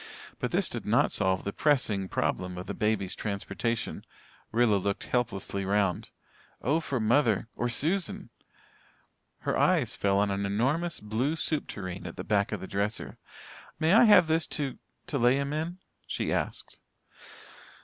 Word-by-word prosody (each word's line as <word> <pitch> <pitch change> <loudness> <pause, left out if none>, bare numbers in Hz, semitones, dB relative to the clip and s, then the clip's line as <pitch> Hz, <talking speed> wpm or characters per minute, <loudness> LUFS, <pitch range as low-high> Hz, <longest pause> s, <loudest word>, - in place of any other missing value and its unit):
But - - -1
this - - +1
did - - -5
not - - +2
solve 95 -1 +1
the 100 - -3
pressing 110 -10 +1
problem 90 -1 -1
of 90 - -6
the - - -4
baby's 105 -3 0
transportation. 105 +3 -3 0.5
Rilla 115 -2 +3
looked 100 +1 -2
helplessly 105 -5 -2
round. 100 -2 0 0.5
Oh, 145 +8 +1
for 140 -5 -2
mother 115 -1 +2
or 120 - -1
Susan! 165 +10 +1 1.1
Her - - -1
eyes - - +2
fell 100 -1 +1
on 100 0 +2
an 100 +1 -1
enormous 135 +13 0
blue 115 +9 -1
soup 155 -2 0
tureen 95 -2 -6
at 85 - -8
the - - -5
back 100 -1 +1
of - - -3
the 95 - -6
dresser. 100 +3 -3 0.6
"May 160 +3 +3
I 230 +3 +8
have 205 -5 +7
this 160 -1 +1
to 140 -4 -3 0.3
to 140 - -2
lay 120 +2 +5
him 140 +1 -1
in?" 165 +4 -3 0.3
she - - -2
asked. - - -3
110 Hz, 160 wpm, -28 LUFS, 100-145 Hz, 1.1 s, I